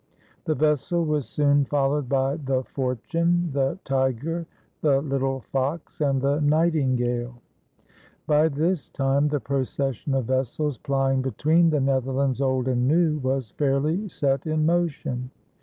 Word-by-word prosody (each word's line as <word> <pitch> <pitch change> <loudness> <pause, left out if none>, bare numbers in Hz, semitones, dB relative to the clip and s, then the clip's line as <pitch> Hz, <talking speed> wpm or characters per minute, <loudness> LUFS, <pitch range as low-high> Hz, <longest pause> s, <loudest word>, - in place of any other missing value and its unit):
The 155 - 0
vessel 155 +3 +1
was 150 -3 -1
soon 145 -1 +3
followed 140 -1 0
by 135 +1 +1
the 135 -4 -1
Fortune, 165 +8 -1
the 135 +2 0
Tiger, 135 +5 -1 0.3
the 140 -3 +3
Little 135 -2 -1
Fox, 140 +7 -3
and 140 -2 +2
the 140 +3 +1
Nightingale. 130 -6 +1 0.9
By 150 +1 +4
this 160 +4 -1
time 140 +2 +1
the 145 -1 0
procession 135 0 -2
of 130 -3 0
vessels 130 +3 -1
plying 135 -2 +1
between 155 +6 +2
the 150 -2 +1
Netherlands 135 0 0
Old 130 -2 +1
and 125 -1 +1
New 155 0 +2
was 130 -4 -2
fairly 150 +8 0
set 140 -3 -1
in 155 0 +1
motion. 155 -7 -1
140 Hz, 135 wpm, -24 LUFS, 130-155 Hz, 0.9 s, By